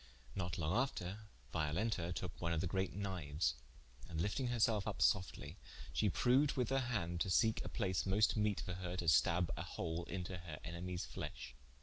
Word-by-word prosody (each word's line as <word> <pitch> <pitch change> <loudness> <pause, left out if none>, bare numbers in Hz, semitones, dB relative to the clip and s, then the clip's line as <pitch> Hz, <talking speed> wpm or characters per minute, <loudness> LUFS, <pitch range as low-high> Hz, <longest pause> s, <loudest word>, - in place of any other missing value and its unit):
Not 90 -2 -2
long 80 +2 0
after, 105 -5 -1 0.3
Violenta 85 +3 0
toke 90 0 -5
one 85 -1 +1
of 80 - +1
the 95 - 0
great 95 +2 0
knifes, 90 -7 -1 0.6
and 80 - -3
lifting 105 +8 0
her 120 0 0
selfe 110 -3 +3
vp 105 -5 -2
softlye, 90 -4 +1 0.4
she 105 - +3
proued 130 - +4
with 125 -4 0
her 135 0 +3
hand, 85 -7 -1
to 95 - +1
seke 110 +5 +3
a - - -4
place 95 -4 0
most 100 +3 +4
meete 105 -2 +1
for 90 - -4
her 90 0 -4
to 85 - -2
stabbe 85 +2 +4
a - - -4
hole 85 +1 -3
into 90 0 -4
her 85 -3 -7
enemies 90 +1 -4
fleshe. - - -6
90 Hz, 190 wpm, -38 LUFS, 85-105 Hz, 0.6 s, proued